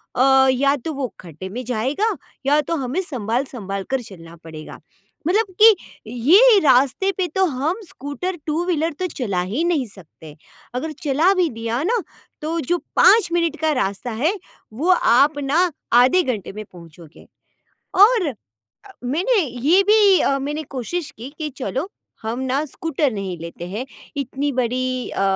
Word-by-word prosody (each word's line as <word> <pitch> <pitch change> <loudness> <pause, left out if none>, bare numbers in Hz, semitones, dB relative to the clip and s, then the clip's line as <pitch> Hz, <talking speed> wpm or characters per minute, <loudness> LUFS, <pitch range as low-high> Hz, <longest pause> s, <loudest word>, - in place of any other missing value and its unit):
अ, 265 +1 +5
या 275 +2 +2
तो 300 +4 -5
वो 275 -3 -2
खड्डे 170 +1 -9
में 245 +6 -6
जाएगा 260 - -1 0.3
या 295 +2 +4
तो 335 - 0
हमें 275 +5 -2
सँभाल-सँभाल 235 - -3
कर 265 -2 0
चलना 170 -6 -12
पड़ेगा 155 -1 -10 0.5
मतलब 420 +6 +3 0.2
कि 440 -1 +9 0.3
ये 380 - +6
रास्ते 275 +8 +3
पे 365 -2 0
तो 380 - +3
हम 310 - -2
स्कूटर 305 +8 -5
टू 315 +3 0
व्हीलर 330 -2 0
तो 370 - -1
चला 215 - -2
ही 280 +11 -1
नहीं 325 -7 +1
सकते। 160 -6 -13 0.4
अगर 310 +5 -3
चला 310 +7 +3
भी 355 -3 +2
दिया 230 +3 -2
ना 455 +6 +1 0.4
तो 325 +2 -2
जो 350 - +2 0.2
5 440 -5 +6
मिनट 335 -2 0
का 315 -1 +2
रास्ता 235 -2 -2
है, 275 - 0 0.4
वो 300 +11 -2
आप 290 -3 +4
ना 285 +5 +1 0.3
आधे 255 +10 +5
घंटे 220 - -3
में 215 +1 -6
पहुँचोगे। 170 -3 -15 0.7
और 410 -3 +5
अ, 280 - -2 0.7
मैंने 360 - +1
ये 295 +7 +2
भी 415 -2 +5
अ, 275 0 +2
मैंने 295 +3 -3
कोशिश 300 +5 -3
की 245 +4 -8
कि 305 -1 -3
चलो 275 +6 -3 0.3
हम 225 +3 -3
ना 265 +3 0
स्कूटर 300 -1 -1
नहीं 195 -4 -4
लेते 170 +1 -7
हैं, 220 +6 -4 0.3
इतनी 280 +1 -2
बड़ी 255 0 -1
अ, - - -2
275 Hz, 160 wpm, -21 LUFS, 235-335 Hz, 0.7 s, कि